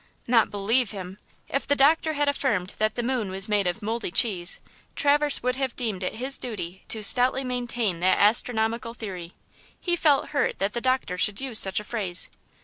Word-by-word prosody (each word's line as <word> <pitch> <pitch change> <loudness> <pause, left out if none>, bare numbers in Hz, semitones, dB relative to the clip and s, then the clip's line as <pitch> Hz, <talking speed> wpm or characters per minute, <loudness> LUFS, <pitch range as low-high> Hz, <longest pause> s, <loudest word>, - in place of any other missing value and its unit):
Not 235 -2 +3
"believe" 220 +4 0
him! 190 -1 -8 0.3
If 275 - -3
the 285 - +3
doctor 315 +3 +3
had 290 -1 0
affirmed 215 -10 -1
that 215 0 0
the 240 - -2
moon 240 -5 -2
was 190 +2 -4
made 205 -3 +1
of 180 +5 -3
moldy 225 0 -3
cheese, 185 -2 0 0.4
Traverse 290 -1 +3
would 250 +1 -1
have 265 -3 -2
deemed 220 -7 -3
it 185 - -3
his 260 +4 +1
duty 190 -6 -6
to 220 -1 -5
stoutly 250 +5 +5
maintain 240 -7 -2
that 185 +2 +2
astronomical 225 +1 +2
theory. 185 -7 -8 0.5
He 350 -2 -1
felt 295 -5 +2
hurt 285 - -1
that 195 +1 -2
the 235 - -3
doctor 255 -8 -1
should 205 -1 +2
use 260 -5 +1
such 190 +1 +5
a - - -8
phrase. 200 -6 -1
230 Hz, 190 wpm, -25 LUFS, 195-260 Hz, 0.5 s, stoutly